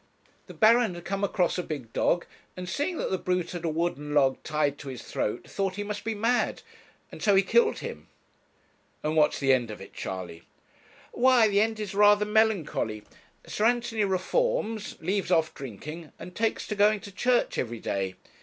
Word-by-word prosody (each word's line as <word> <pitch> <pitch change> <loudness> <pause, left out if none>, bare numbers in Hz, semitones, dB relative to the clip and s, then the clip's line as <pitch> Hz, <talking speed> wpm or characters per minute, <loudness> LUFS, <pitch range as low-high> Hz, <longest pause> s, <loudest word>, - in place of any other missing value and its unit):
The - - -11
Baron 225 -3 +4
had 175 - -10
come 195 +1 -2
across 180 -2 +1
a - - +1
big 140 -9 -7
dog, 175 - +1 0.3
and 180 0 -6
seeing 295 - -2
that - - -2
the 190 - 0
brute 180 -1 -1
had 175 -2 -6
a 165 - 0
wooden 155 -2 -2
log 135 -2 +3
tied 150 -2 -1
to 140 - -9
his 130 -2 -7
throat, 105 - -3
thought 195 -2 -2
he 205 - -3
must 205 0 -5
be 225 -1 -2
mad, 230 +4 0 0.5
and - - -10
so 205 -2 +4
he 195 - +5
killed 455 - +3
him.' - - -7 1.0
'And 155 +1 -1
what's 150 -1 +3
the 135 -1 +3
end 120 -3 +1
of 110 - -7
it, 95 - -12
Charley?' 90 -3 -6 0.7
'Why, 250 -2 +5
the 200 -1 +3
end 220 0 0
is 210 -2 -4
rather 205 +1 +5
melancholy. 205 - +1 0.4
Sir 210 - -1
Anthony 235 -2 +1
reforms, 220 - 0
leaves 190 +3 -1
off 160 -3 +2
drinking, 150 - -8
and 180 - -10
takes 225 0 0
to 210 - -2
going 210 +1 +4
to 200 - -10
church 245 +5 +1
everyday. 100 -5 -3
190 Hz, 185 wpm, -27 LUFS, 150-215 Hz, 1.0 s, he